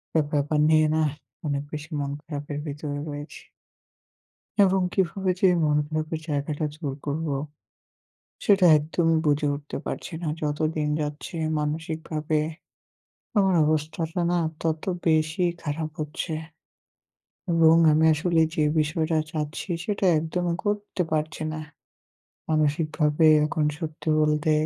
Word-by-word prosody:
একটা 160 - +5
ব্যাপার 150 +1 +1
নিয়ে 155 -1 +5
নাহ, 155 -1 +2 0.4
অনেক 140 -1 -1
বেশি 150 +1 -6
মন 140 0 -2
খারাপের 145 -1 -6
ভিতরে 145 0 -4
রয়েছি। 145 +1 -7 1.2
এবং 190 0 +3
কিভাবে 190 0 0
যে - - +3
এই - - +1
মনখারাপের 155 +2 0
জায়গাটা 145 +1 -1
জোর 150 -4 -4
করব। 155 +3 -2 1.2
সেটা 200 -5 +5
একদমই 165 +2 +1
বুঝে 150 0 +2
উঠতে 145 +1 -7
পারছি - - -5
না। 165 - -1
যত 150 -1 -1 0.2
দিন 150 -1 0
যাচ্ছে 150 +3 -5 0.2
মানসিকভাবে, 155 0 -2 1.0
আমার 195 -2 +4
অবস্থাটা 160 +3 -1
না, 175 - +2 0.2
তত 160 -1 -1 0.2
বেশি 160 +2 +2 0.2
খারাপ 155 +1 -3
হচ্ছে। 155 +2 -4 1.2
এবং 165 -1 +6 0.2
আমি 155 +1 +4
আসলে 165 +1 +2
যে, 155 - +2 0.2
বিষয়টা 160 +1 0
চাচ্ছি 155 +4 -4 0.2
সেটা 205 -3 -1
একদমই 170 +2 -1
করতে 205 -2 -1
পারছি 155 0 -1
না। 155 - -4 0.9
মানসিকভাবে 155 0 +2 0.2
এখন 155 0 0
সত্যি 160 -1 -7
বলতে। 150 0 +2
155 Hz, 120 wpm, -25 LUFS, 150-165 Hz, 1.2 s, এবং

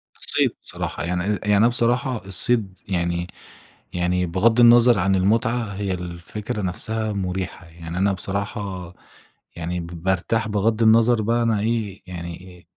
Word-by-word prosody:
الصيد - - +2
صراحة، - - -5
يعني 90 +1 -1
أ 105 0 0
يعني 105 -1 +3
أنا 115 +3 +5
بصراحة 120 -2 +1
الصيد 100 0 +1
يعني 85 -1 -1 0.7
يعني 90 +1 0
بغض 110 +7 +2
النَظَر 120 -1 +7
عن 95 +2 +2
المتعة، 110 +2 +1
هي 100 -1 -2
الفكرة 90 +4 -5
نفسها 110 +4 -2
مُريحة. 95 -2 -4
يعني 85 +1 -7
أنا 100 +1 +2
بصراحة 95 -2 -4 0.6
يعني 85 +1 -3
ب 85 - -6 0.2
بارتاح 100 +4 0
بغض 105 +2 +1
النظر 115 +1 +5
بقى 115 +2 +1
أنا 110 -3 +1
إيه، 110 -3 -2
يعني 90 +1 -8
أ - - -23
100 Hz, 145 wpm, -22 LUFS, 90-115 Hz, 0.7 s, النَظَر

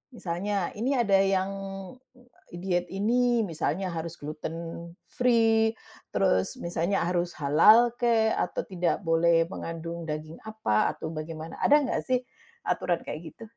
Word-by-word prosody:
misalnya, 190 +1 -2
ini 265 +4 +1
ada 200 -6 +3
yang, 195 0 +2 1.0
diet 175 0 -1
ini, 235 +4 +2
misalnya 175 +1 -2
harus 165 0 -5
gluten 155 +2 -6 0.6
free, 225 -2 +3 0.4
terus - - +2
misalnya 175 -2 -1
harus 175 0 -1
halal 210 +12 +6
kek, 230 -2 +3
atau 180 - -1
tidak 180 0 -1
boleh 165 0 +4
mengandung 165 0 -6
daging 155 +1 -5
apa, 220 - 0
atau 160 - -6
bagaimana 160 0 -7
ada 295 +1 +5
enggak 265 - -1
sih, 255 -1 +1 0.4
aturan 175 -2 -1
kayak 160 +1 -7
gitu? 230 - -11
180 Hz, 130 wpm, -27 LUFS, 165-220 Hz, 1.0 s, halal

